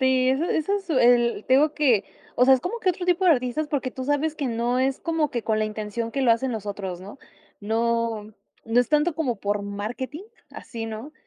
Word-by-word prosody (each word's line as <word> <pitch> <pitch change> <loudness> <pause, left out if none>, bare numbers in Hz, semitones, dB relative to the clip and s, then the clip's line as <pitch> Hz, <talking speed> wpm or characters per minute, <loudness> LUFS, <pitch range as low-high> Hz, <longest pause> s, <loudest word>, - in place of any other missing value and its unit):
Sí, 260 -1 +3
eso 270 +5 +1
eso 375 +4 0
su 365 -4 -5
el 240 -2 +3
te 260 - +4
digo 300 +3 +3
que, 250 -9 +3 0.3
o 250 - +5
sea, 265 - +7
es 255 - -1
como 405 - -4
que 375 - +3
otro 355 0 -5
tipo 360 +1 +2
de 360 - +6
artistas, 255 +3 -1
porque 270 -3 -2
tú 260 +1 -6
sabes 290 +3 0
que 285 -3 -3
no 240 +1 0
es 265 +1 0
como 325 -3 0
que 235 - -3
con 215 -1 0
la 215 - +1
intención 215 +2 -4
que 275 +1 -2
lo 245 - +4
hacen 250 +3 -1
los 215 -2 -5
otros, 190 -3 -5
¿no? 200 +8 -11 0.4
No, 225 0 -1 0.3
no 230 +2 +3
es 245 - -1
tanto 300 +2 +2
como 270 -8 -1
por 205 +1 -1
marketing 240 - -5 0.3
así, 225 -1 -7
¿no? 225 +7 -7
250 Hz, 230 wpm, -24 LUFS, 225-295 Hz, 0.4 s, sea